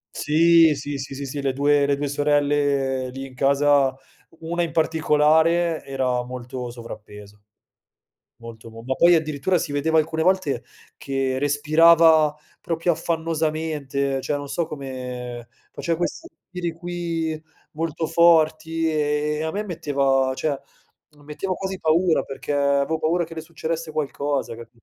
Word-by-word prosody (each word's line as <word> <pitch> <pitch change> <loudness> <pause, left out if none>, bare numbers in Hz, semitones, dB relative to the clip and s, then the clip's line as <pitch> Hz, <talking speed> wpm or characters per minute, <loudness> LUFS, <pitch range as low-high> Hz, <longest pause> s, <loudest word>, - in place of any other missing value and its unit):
Sì, 165 +1 +4
sì, 140 0 -5
sì, 135 0 -6
sì, 140 +1 -5
sì, 140 +1 -5
le 135 -1 0
due 145 +1 +2
le 140 -1 +1
2 145 - -2
sorelle 145 -2 +1
lì 135 +1 -7
in 135 - -12
casa, 140 0 +3 0.5
1 170 +2 -2
in 170 - -1
particolare, 160 +1 +2
era 130 -2 -1
molto 125 0 -6
sovrappeso, 105 -3 -11 0.9
molto, 115 -1 -11
mo 115 0 -11
ma 130 +2 -1
poi 175 +5 +5
addirittura 155 +3 0
si 155 - -3
vedeva 160 +3 +1
alcune 160 +1 0
volte 160 -8 +1 0.3
che 135 -1 -2
respirava 155 +2 +5 0.3
proprio 165 +1 0
affannosamente, 155 -4 -2
cioè 145 - -2
non 145 0 -7
so 160 +3 -2
come 125 -4 -7 0.2
faceva 165 -1 -2
questi 325 - -3
respiri 180 -2 -6
qui 165 -2 -3 0.3
molto 160 0 -3
forti 160 -1 +3
e 150 0 0
e 155 - -2
a 160 - -1
me 205 +5 -3
metteva 140 -7 0
cioè, 145 0 -1 0.7
metteva 170 +6 -4
quasi 190 -1 -5
paura 165 +2 +2
perché 140 +1 -6
avevo 140 +2 +1
paura 170 +2 +1
che 165 - -9
le 160 - -6
succedesse 165 0 -5
qualcosa, 140 -5 -2
cap 115 0 -11
150 Hz, 145 wpm, -23 LUFS, 135-165 Hz, 0.9 s, poi